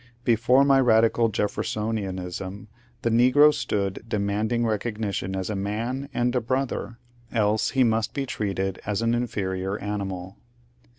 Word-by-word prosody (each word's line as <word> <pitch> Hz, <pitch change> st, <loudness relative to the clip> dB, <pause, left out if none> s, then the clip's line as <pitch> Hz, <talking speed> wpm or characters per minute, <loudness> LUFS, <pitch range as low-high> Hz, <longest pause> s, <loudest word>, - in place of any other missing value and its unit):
Before 125 Hz, +3 st, +4 dB
my 135 Hz, -1 st, +5 dB
radical 115 Hz, -1 st, +4 dB
Jeffersonianism 100 Hz, -2 st, -3 dB, 0.3 s
the 115 Hz, -, +1 dB
negro 130 Hz, +6 st, +6 dB
stood 100 Hz, -7 st, -2 dB
demanding 110 Hz, +3 st, 0 dB
recognition 105 Hz, -3 st, -2 dB
as 95 Hz, -1 st, -3 dB
a -, -, -2 dB
man 115 Hz, +8 st, -3 dB
and 120 Hz, -1 st, 0 dB
a 125 Hz, -, +2 dB
brother; 130 Hz, -1 st, -2 dB, 0.3 s
else 110 Hz, -1 st, +1 dB
he 130 Hz, -, +6 dB
must 110 Hz, -2 st, 0 dB
be 140 Hz, -1 st, -1 dB
treated 95 Hz, -5 st, -3 dB
as 105 Hz, +1 st, -1 dB
an 115 Hz, 0 st, +2 dB
inferior 100 Hz, -5 st, -2 dB
animal. 95 Hz, -3 st, -5 dB
110 Hz, 130 wpm, -25 LUFS, 100-120 Hz, 0.3 s, negro